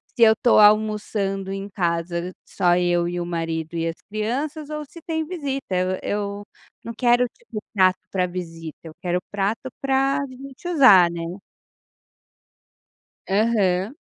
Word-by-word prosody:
se 235 - +4
eu 220 - +8
tô 240 - +5
almoçando 210 -2 +2
em 195 +1 -5
casa 170 -1 -2
só 175 -3 +2
eu 175 -1 +2
e 175 0 -3
o 175 - -2
marido 165 -1 -3
e 165 0 -1
as 165 - -3
crianças 280 +8 -3
ou 300 0 -4
se 315 +4 -14
tem 320 -1 -2
visita 280 - -4
eu 185 +1 0
eu 205 0 -3 0.4
não 230 - -6
quero, 245 +1 +3
tipo, 440 - -9
prato 185 -2 +4
para 185 -2 +1
visita 165 -3 -7
eu 160 - -10
quero 180 0 0
prato 205 +6 -1
para 270 +1 +2
gente 270 +5 -10
usar, 210 - +7
né? 170 - -5 2.1
Aham. 200 +1 +1
200 Hz, 145 wpm, -23 LUFS, 175-255 Hz, 2.1 s, eu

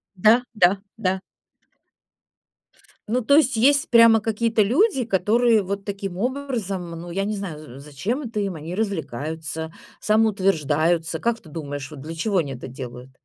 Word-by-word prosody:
Да, 215 +6 +5
да, 190 -2 +4 0.2
да. 190 -3 0 1.9
Ну 245 +4 +1
то 280 +4 +4
есть 265 -5 +3
есть 280 +6 +3
прямо 230 -1 +7
какие-то 225 0 +1
люди, 265 - +2
которые 225 +2 +3
вот 195 +1 -4
таким 195 -2 -5
образом, 230 -7 -3
ну, 170 +1 -8
я 195 +3 -1
не 210 +1 -2
знаю, 190 -6 -5
за 140 -4 -11
зачем 150 - -4
это 230 -5 -4
им, 195 -2 -2
они 160 +2 -7
развлекаются, 160 - -4 0.3
самоутверждаются. 175 -7 +1
Как 235 +6 0
ты 160 - -16
думаешь, 145 -3 -6
вот 150 -3 -10
для 155 +4 -7
чего 195 +4 0
они 145 -5 -1
это 125 - -8
делают? 125 -1 -9
195 Hz, 155 wpm, -23 LUFS, 160-225 Hz, 1.9 s, прямо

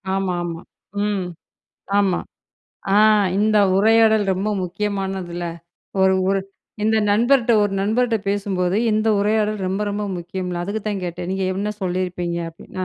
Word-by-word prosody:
ஆமா, 195 -2 -1
ஆமா. 170 -1 -5 0.4
ம். 200 -3 -1 0.7
ஆமா. 195 -3 +2 0.8
ஆ - - +5 0.4
இந்த 215 +1 +3 0.2
உரையாடல் 220 +1 +4
ரொம்ப 200 +3 -1
முக்கியமானதுல. 190 -2 -3 0.6
ஒரு, 190 0 +4
ஒரு, 195 0 +2 0.4
இந்த 220 0 +3
நண்பர்ட்ட 240 +2 +3
ஒரு 205 -1 -1
நண்பர்ட்ட 225 +3 +1
பேசும்போது, 195 -2 0
இந்த 215 +1 +1
உரையாடல் 210 0 +1
ரொம்ப 190 +2 -2
ரொம்ப 205 +1 -2
முக்கியம்ல. 175 0 -4
அதுக்குத்தான் 205 0 -3
கேட்டேன், 175 +1 -5
நீங்க 190 0 -1
என்ன 210 +2 -2
சொல்லிருப்பீங்க? 180 -2 -2
அப்டின்னு 165 +3 -11
195 Hz, 125 wpm, -21 LUFS, 180-210 Hz, 0.8 s, ஆ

